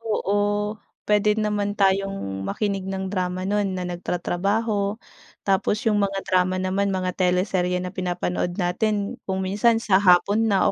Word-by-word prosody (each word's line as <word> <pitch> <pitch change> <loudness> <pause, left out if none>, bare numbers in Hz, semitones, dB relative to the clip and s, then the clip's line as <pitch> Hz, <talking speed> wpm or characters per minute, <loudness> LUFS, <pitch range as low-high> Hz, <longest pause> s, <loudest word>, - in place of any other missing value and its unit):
oo, 205 -1 0 0.3
pwede 210 0 +3
naman 210 -1 -1
tayong 195 - 0
makinig 195 - -2
ng 190 0 -3
drama 185 -1 -2
nun 200 -1 0
na 180 - -3
nagtratrabaho. 200 +4 -1 0.5
Tapos 205 +4 +1
'yung 210 -2 +2
mga 195 -1 -1
drama 185 0 +2
naman 190 +2 0
mga 185 -1 -1
teleserye 180 0 0
na 180 - -5
pinapanood 180 -1 -2
natin 200 +3 -1
kung 190 0 -1
minsan 210 +5 +3
sa 205 -4 +3
hapon 200 +4 +4
na 195 -3 +3
195 Hz, 140 wpm, -23 LUFS, 185-205 Hz, 0.5 s, hapon